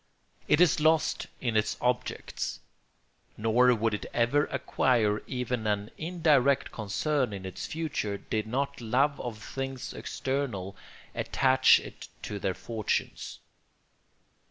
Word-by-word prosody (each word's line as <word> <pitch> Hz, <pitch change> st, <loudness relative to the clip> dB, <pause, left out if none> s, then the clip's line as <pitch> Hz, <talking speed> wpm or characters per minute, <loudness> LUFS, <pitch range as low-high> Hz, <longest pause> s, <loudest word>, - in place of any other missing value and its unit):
It 150 Hz, -, +4 dB
is 180 Hz, -4 st, +5 dB
lost 155 Hz, 0 st, +2 dB
in 120 Hz, -3 st, -1 dB
its 105 Hz, -2 st, +1 dB
objects; 125 Hz, 0 st, -2 dB, 0.8 s
nor 120 Hz, +3 st, +4 dB
would 115 Hz, -2 st, +1 dB
it 105 Hz, -, -3 dB
ever 120 Hz, +5 st, +3 dB
acquire 120 Hz, -5 st, +1 dB
even 125 Hz, -3 st, -2 dB
an 105 Hz, 0 st, -1 dB
indirect 155 Hz, -6 st, +2 dB
concern 120 Hz, +4 st, -1 dB
in 95 Hz, -1 st, -6 dB
its 95 Hz, -, -5 dB
future, 150 Hz, -11 st, -2 dB
did 110 Hz, +2 st, -3 dB
not 140 Hz, +3 st, -2 dB
love 135 Hz, +6 st, +1 dB
of 120 Hz, -3 st, -5 dB
things 135 Hz, 0 st, -5 dB
external 120 Hz, -9 st, -3 dB, 0.4 s
attach 130 Hz, 0 st, +4 dB
it -, -, -10 dB, 0.2 s
to 105 Hz, -, -4 dB
their 95 Hz, -1 st, -1 dB
fortunes. 110 Hz, -3 st, -3 dB
125 Hz, 120 wpm, -29 LUFS, 110-140 Hz, 0.8 s, is